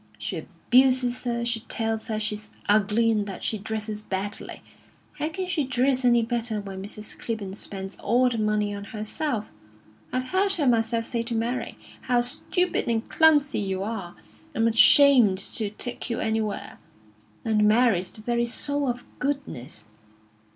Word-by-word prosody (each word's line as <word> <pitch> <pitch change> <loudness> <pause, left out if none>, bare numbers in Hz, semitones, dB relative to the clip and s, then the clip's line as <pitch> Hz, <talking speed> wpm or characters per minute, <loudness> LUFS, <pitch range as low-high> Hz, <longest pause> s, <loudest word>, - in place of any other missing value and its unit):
She 105 0 -4
abuses 250 +9 +2
her; 235 -1 -1
she 235 -1 0
tells 225 -1 -2
her 215 -1 -2
she's 215 0 -4 0.2
ugly, 215 +2 +3
and 210 -2 0
that 195 - -7
she 215 - -1
dresses 215 0 -4
badly. 200 0 -5 0.6
How 305 - -1
can 370 +4 -4
she 345 -5 0
dress 260 0 +1
any 240 -1 +4
better 230 -2 -2
when 195 -2 -7
Mrs. 210 +2 -6
Clibborn 215 -5 -4
spends 195 -1 -5
all 245 +4 +2
the 235 -2 -1
money 210 -1 0
on 200 0 -6
herself? 215 +3 -3 0.7
I've 255 0 -2
heard 390 +1 +2
her 320 -6 0
myself 230 -2 +2
say 235 -1 -2
to 230 0 -4
Mary: 235 +3 -2 0.2
'How 245 -1 +2
stupid 315 +8 0
and 230 -1 0
clumsy 295 -4 +4
you 190 -2 -2
are! 195 -5 -5 0.4
I'm 225 -1 +2
ashamed 235 -2 +7
to 205 +2 0
take 240 +4 -4
you 230 - -2
anywhere.' 220 -1 -2 0.7
And 215 -2 +3
Mary's 215 -5 +3
the 215 - -9
very 235 +1 0
soul 285 +3 -1
of 245 0 -3
goodness. 275 - -4
225 Hz, 160 wpm, -25 LUFS, 210-250 Hz, 0.7 s, ashamed